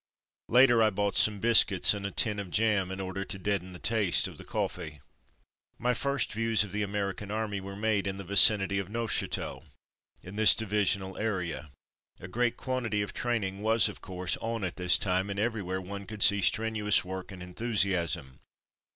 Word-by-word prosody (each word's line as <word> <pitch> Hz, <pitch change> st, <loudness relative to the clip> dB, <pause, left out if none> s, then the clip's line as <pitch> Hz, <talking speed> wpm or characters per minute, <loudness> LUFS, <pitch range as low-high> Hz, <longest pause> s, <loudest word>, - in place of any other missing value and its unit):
Later, 120 Hz, -1 st, +5 dB
I 110 Hz, -, +5 dB
bought 100 Hz, 0 st, -2 dB
some 105 Hz, -1 st, +4 dB
biscuits 105 Hz, -4 st, +4 dB
and 100 Hz, -1 st, -4 dB
a -, -, -4 dB
tin 105 Hz, -1 st, +1 dB
of 100 Hz, -3 st, -6 dB
jam 105 Hz, -2 st, +1 dB
in 95 Hz, 0 st, -6 dB
order 95 Hz, 0 st, -4 dB
to 95 Hz, -, -2 dB
deaden 95 Hz, -1 st, -2 dB
the 90 Hz, -, -9 dB
taste 105 Hz, -2 st, +1 dB
of -, -, -11 dB
the -, -, -9 dB
coffee. 75 Hz, -1 st, -4 dB, 0.8 s
My 125 Hz, +1 st, 0 dB
first 140 Hz, 0 st, -1 dB
views 115 Hz, -1 st, +2 dB
of 105 Hz, -, -8 dB
the 105 Hz, -, -2 dB
American 100 Hz, 0 st, -3 dB
Army 105 Hz, -2 st, -3 dB
were 100 Hz, +1 st, -8 dB
made 105 Hz, -1 st, 0 dB
in 95 Hz, 0 st, -3 dB
the 100 Hz, -, -6 dB
vicinity 100 Hz, +1 st, +4 dB
of 100 Hz, -1 st, -5 dB
Neuf 115 Hz, +1 st, -3 dB
chateau, -, -, -3 dB, 0.6 s
in 95 Hz, +3 st, -10 dB
this 110 Hz, 0 st, +6 dB
divisional 100 Hz, -3 st, -1 dB
area. 90 Hz, -8 st, -3 dB, 0.5 s
A 90 Hz, -, -9 dB
great 120 Hz, +4 st, -1 dB
quantity 115 Hz, -5 st, -2 dB
of 100 Hz, -, -7 dB
train 120 Hz, -3 st, -1 dB
ing 95 Hz, +1 st, -5 dB
was, 110 Hz, +1 st, +3 dB
of -, -, -8 dB
course, 90 Hz, -1 st, -3 dB
on 115 Hz, -2 st, -4 dB
at 90 Hz, -2 st, -4 dB
this 90 Hz, -1 st, +4 dB
time, 95 Hz, 0 st, 0 dB
and 100 Hz, -, -4 dB
every 110 Hz, +1 st, -1 dB
where 95 Hz, 0 st, -3 dB
one 100 Hz, +1 st, -8 dB
could 105 Hz, 0 st, -3 dB
see 100 Hz, -1 st, +5 dB
strenuous 110 Hz, -1 st, +1 dB
work 95 Hz, +1 st, -7 dB
and 90 Hz, -2 st, -9 dB
enthusiasm. 90 Hz, -, -1 dB
100 Hz, 195 wpm, -29 LUFS, 95-110 Hz, 0.8 s, this